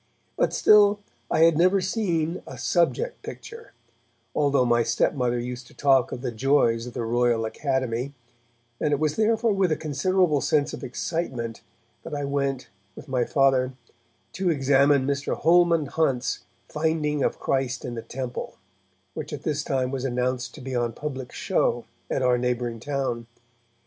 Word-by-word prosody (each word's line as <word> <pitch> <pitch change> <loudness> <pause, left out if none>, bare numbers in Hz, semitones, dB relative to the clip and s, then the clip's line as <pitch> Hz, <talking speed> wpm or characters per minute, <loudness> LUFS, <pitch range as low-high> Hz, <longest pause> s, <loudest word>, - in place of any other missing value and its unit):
But - - +1
still 210 -1 +5 0.3
I - - +2
had 165 -1 +6
never 185 +3 +4
seen 180 -4 -1
a 130 - -8
subject 175 - 0
picture, 460 0 -10 0.6
although 140 -3 +2
my 120 -1 +3
stepmother 125 +1 +1
used 125 +1 -5
to - - -19
talk 135 -3 +3
of 125 - -5
the 125 - -2
joys 120 -1 +2
of 125 - -8
the 120 - -2
Royal 120 -1 +1
Academy, 130 0 -2 0.7
and 150 - +1
it 145 - +1
was 155 -1 0
therefore 225 0 +2
with 190 -3 +1
a - - +3
considerable 155 +1 +1
sense 145 +2 +1
of - - -7
excitement 125 -5 -3 0.4
that 160 - -6
I 145 - -3
went, 140 -2 -1 0.3
with - - -11
my 130 -3 0
Father, 135 -1 +2 0.6
to 190 -1 0
examine 140 -2 +3
Mr. 140 +1 -2
Holman 170 -1 +4
Hunt's 135 -4 0 0.3
'Finding 150 -2 0
of - - 0
Christ 130 -2 -1
in 125 - -4
the 115 - -5
Temple' 125 0 -6 0.6
which - - -6
at 150 -1 -6
this 150 -1 -1
time 130 -2 -1
was 135 -2 -3
announced 125 -1 -2
to 150 - -10
be 130 0 -5
on 120 -1 0
public 135 -4 -6
show - - 0 0.2
at 130 - 0
our 125 -1 +3
neighbouring 120 -2 -2
town. 130 -3 -3
135 Hz, 160 wpm, -25 LUFS, 125-160 Hz, 0.7 s, had